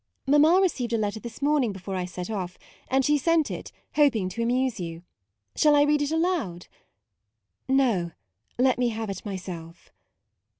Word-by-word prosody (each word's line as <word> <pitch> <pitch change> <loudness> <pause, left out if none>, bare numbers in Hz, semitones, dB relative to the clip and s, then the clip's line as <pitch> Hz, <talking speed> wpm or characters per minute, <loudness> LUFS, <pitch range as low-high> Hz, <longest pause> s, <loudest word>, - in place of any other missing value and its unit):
" - - -49
" - - -53
Mamma 300 +6 +5
received 260 -11 0
a - - +3
letter 210 0 -2
this 235 0 -9
io8 - - -16
MAUDE 290 - +3
morning 260 -8 +2
before 190 0 -6
I 180 -1 -2
set 180 +2 -6
off; 185 -4 -4 0.3
and 265 0 +2
she 295 0 +3
sent 330 +1 +2
it, - - -6 0.2
hoping 245 -11 +3
to 230 - -5
amuse 250 0 0
you. 165 -1 -6 0.5
Shall 300 -1 +5
I 290 - +6
read 295 0 +2
it 290 - 0
aloud? 320 - -1 0.4
" 105 - -55
" 95 -1 -54
No, 245 -10 +2 0.5
let 255 0 +3
me 245 -1 +2
have 220 -2 -4
it 190 - -7
myself." 180 -4 -8
235 Hz, 200 wpm, -26 LUFS, 185-290 Hz, 0.5 s, I